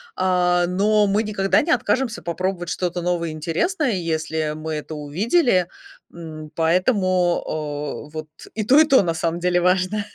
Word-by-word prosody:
А, 180 Hz, -1 st, +2 dB
но 205 Hz, +3 st, +2 dB
мы 205 Hz, +2 st, +1 dB
никогда 195 Hz, -2 st, +1 dB
не 335 Hz, -, -1 dB
откажемся 255 Hz, -7 st, 0 dB
попробовать 175 Hz, +1 st, -3 dB
что-то 175 Hz, +3 st, -2 dB
новое 175 Hz, -1 st, -1 dB
и -, -, -5 dB
интересное, 175 Hz, -, -1 dB
если 160 Hz, -3 st, -2 dB
мы 155 Hz, 0 st, -5 dB
это 155 Hz, +1 st, -6 dB
увидели, 185 Hz, -, +1 dB, 0.5 s
м, 155 Hz, -2 st, -9 dB
поэтому, 185 Hz, +1 st, +2 dB
а, 150 Hz, -1 st, -5 dB
вот 155 Hz, 0 st, -6 dB, 0.3 s
и 215 Hz, -, -2 dB
то, 270 Hz, +6 st, +6 dB
и -, -, +8 dB
то, 275 Hz, -3 st, +5 dB
на 170 Hz, -2 st, -1 dB
самом 165 Hz, +1 st, -2 dB
деле, 175 Hz, 0 st, +1 dB
важно. 185 Hz, +3 st, +1 dB
180 Hz, 160 wpm, -22 LUFS, 160-200 Hz, 0.5 s, и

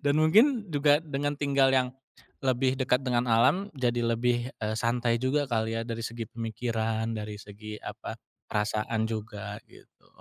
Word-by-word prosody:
Dan 145 Hz, +2 st, +3 dB
mungkin 220 Hz, -, +5 dB
juga, 145 Hz, -1 st, +4 dB
dengan 145 Hz, -2 st, -2 dB
tinggal 140 Hz, -2 st, +3 dB
yang 130 Hz, -1 st, +3 dB, 0.6 s
lebih 130 Hz, 0 st, +2 dB
dekat 125 Hz, 0 st, +2 dB
dengan 120 Hz, -1 st, +1 dB
alam, 180 Hz, -, +4 dB
jadi 120 Hz, -1 st, +1 dB
lebih, 120 Hz, +1 st, +1 dB
eee, 110 Hz, 0 st, -1 dB
santai 115 Hz, +1 st, +1 dB
juga 140 Hz, +3 st, +1 dB
kali 110 Hz, -1 st, 0 dB
ya -, -, -1 dB
dari 115 Hz, -1 st, -4 dB
segi 115 Hz, 0 st, -4 dB
pemikiran, 115 Hz, -1 st, -2 dB
dari 105 Hz, -1 st, -5 dB
segi 105 Hz, +1 st, -9 dB
apa, -, -, -7 dB, 0.3 s
perasaan 110 Hz, +1 st, 0 dB
juga 110 Hz, -2 st, -5 dB
gitu. -, -, -21 dB
120 Hz, 155 wpm, -28 LUFS, 110-135 Hz, 0.6 s, mungkin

